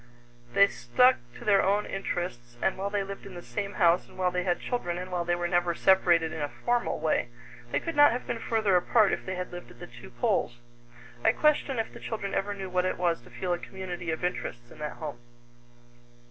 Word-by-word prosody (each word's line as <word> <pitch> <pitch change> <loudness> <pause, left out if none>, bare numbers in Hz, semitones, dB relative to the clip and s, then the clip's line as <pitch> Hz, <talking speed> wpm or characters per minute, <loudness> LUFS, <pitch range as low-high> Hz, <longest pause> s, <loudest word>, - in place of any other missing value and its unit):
They 200 0 +7
stuck 250 - +3 0.2
to - - -11
their 200 -2 +5
own 205 +2 +2
interests, 150 -11 -4
and 190 - +1
while 195 +1 -3
they 205 -1 0
lived 195 0 -8
in 190 - -10
the 175 - -8
same 200 -1 -4
house 175 -2 +3
and - - -17
while 180 -1 +1
they 180 0 0
had 175 -1 0
children 175 -9 -2
and 185 +1 -6
while 175 -1 -1
they 175 0 +2
were 175 0 -1
never 175 -1 +1
separated 175 -4 +4
in 160 - -4
a 145 - -1
formal 240 +7 -1
way, 155 -5 +1 0.4
they - - +2
could 330 - -4
not 290 0 +7
have 245 +2 -3
been 230 - -3
further 220 -4 +1
apart 205 +3 +4
if - - -3
they 185 - -2
had 180 0 -5
lived 175 0 -8
at 120 0 -16
the - - -7
two 120 - -13
poles. 120 0 0 0.7
I - - +5
question 295 -3 +2
if 225 - -2
the - - -10
children 205 -3 -4
ever 205 +1 -1
knew 195 -1 -5
what 180 0 0
it 185 - -1
was 170 -5 +1
to - - -16
feel 180 -2 -2
a 175 - -2
community 180 -3 -6
of 160 +2 -2
interests 120 -9 -3
in - - -14
that 150 0 -4
home. 145 -6 -7
180 Hz, 230 wpm, -28 LUFS, 170-200 Hz, 0.7 s, They